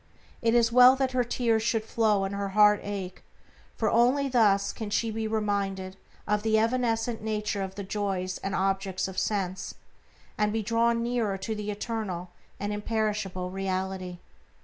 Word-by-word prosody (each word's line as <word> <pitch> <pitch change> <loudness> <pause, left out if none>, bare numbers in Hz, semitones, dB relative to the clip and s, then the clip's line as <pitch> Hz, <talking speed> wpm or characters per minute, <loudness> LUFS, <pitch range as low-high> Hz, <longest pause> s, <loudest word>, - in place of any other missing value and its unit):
It 230 0 +2
is 235 -1 +4
well 250 +2 +8
that 265 -1 0
her 255 -1 +2
tears 230 -2 +1
should 225 -1 0
flow 215 -3 +2
and 195 +1 -3
her 200 0 -2
heart 210 -1 +6
ache, 195 -3 -5 0.5
for 220 - 0
only 255 +4 +3
thus 210 -6 +3
can 220 -2 -5
she 225 +2 0
be 220 0 -2
reminded 200 -3 -2 0.3
of 210 0 +1
the 220 0 +2
evanescent 230 0 0
nature 210 -2 -2
of 190 0 -5
the 200 - -5
joys 190 -2 -2
and 195 0 -3
objects 195 -1 -1
of 190 -1 -3
sense, 190 -3 -2 0.6
and 210 0 +2
be 220 0 -1
drawn 230 +2 +2
nearer 235 -5 -1
to 220 +4 -4
the 210 -1 -5
eternal 205 -4 -4 0.3
and 205 +1 -2
imperishable 210 -4 -2
Reality. 190 -1 -3
210 Hz, 165 wpm, -27 LUFS, 195-230 Hz, 0.6 s, well